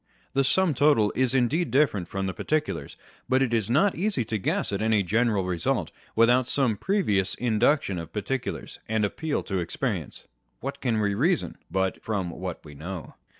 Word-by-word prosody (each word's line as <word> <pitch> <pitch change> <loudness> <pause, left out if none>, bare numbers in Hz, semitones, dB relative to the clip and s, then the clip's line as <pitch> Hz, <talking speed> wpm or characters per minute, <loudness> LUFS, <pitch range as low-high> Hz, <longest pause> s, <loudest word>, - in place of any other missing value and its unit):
The 135 0 +3
sum 170 +5 +3
total 140 -6 +3
is 130 0 +2
indeed 140 +6 +2
different 125 - +2
from 95 0 -3
the 95 - -2
particulars; 155 - -2 0.3
but 130 +1 +4
it 120 -3 -1
is 110 -3 +1
not 160 +11 +4
easy 180 - 0
to 110 0 -2
guess 100 - -1
at 100 - -1
any 110 -2 +3
general 110 0 +1
result, 90 -2 0 0.2
without 120 +2 +4
some 130 -6 +2
previous 100 - +1
induction 115 - +1
of 85 -1 -8
particulars 110 +5 -4
and 110 -1 +2
appeal 150 +8 -2
to 95 -2 -2
experience. 85 - -3 0.3
What - - -5
can 115 -4 +1
we 100 -1 +1
reason, 160 - +1
but 95 0 -1
from 100 -5 -2
what 90 0 -6
we 75 - -10
know 85 +4 -7
110 Hz, 175 wpm, -26 LUFS, 95-135 Hz, 0.3 s, but